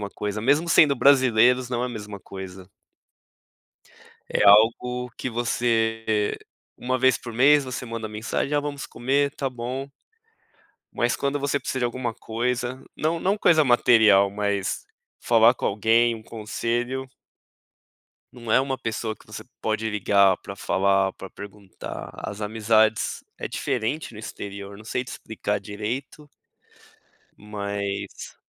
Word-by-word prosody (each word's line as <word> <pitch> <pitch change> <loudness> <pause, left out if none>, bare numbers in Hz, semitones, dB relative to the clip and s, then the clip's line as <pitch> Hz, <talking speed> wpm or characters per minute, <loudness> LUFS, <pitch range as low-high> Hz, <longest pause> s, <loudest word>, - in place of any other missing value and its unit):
coisa, 105 0 -3
mesmo 145 +8 +2
sendo 150 -4 +6
brasileiros, 125 -2 +4
não 125 -1 -1
é - - +1
a - - -6
mesma 105 -3 -7
coisa. 95 -1 -9 1.6
É - - +1
algo 115 +4 +4
que - - -3
você 110 -2 0 0.4
uma 130 +1 -1
vez 130 0 +4
por 120 - -8
mês 140 +5 +5
você 130 -1 -5
manda 115 -1 -5
mensagem: 110 +6 -3
"Ah, 145 - +3
vamos 145 -1 -5
comer? 140 +3 0
Tá 135 - -2
bom." 130 +3 -5 1.0
Mas 120 0 0
quando 140 +1 -1
você 140 0 0
precisa 130 - -3
de 125 - +1
alguma 120 -1 -2
coisa, 120 +3 -3
não 165 +2 -1
não 195 +3 +1
coisa 160 -6 +5
material, 110 -6 +5
mas 100 -1 -2 0.4
falar 115 +1 +5
com - - -7
alguém, 115 +3 +3
um 110 - -12
conselho 120 +4 -3 1.2
não 115 -2 -8
é 130 - +6
uma 135 -1 -2
pessoa 110 -1 -3
que - - -22
você - - -8 0.2
pode 110 0 -1
ligar 100 -2 +3
pra 100 - -9
falar, 95 0 +1
pra 95 - -9
perguntar. 100 0 -9
As 105 - -6
amizades 110 0 +1
é - - -5
diferente 125 +4 -2
no 105 - -9
exterior 100 -2 -7
eu - - -12
não 110 - -13
sei 125 - -2
te 130 - -13
explicar 105 -1 -3
direito 115 +9 -6 1.1
mas 100 -1 -5
115 Hz, 140 wpm, -24 LUFS, 105-130 Hz, 1.6 s, sendo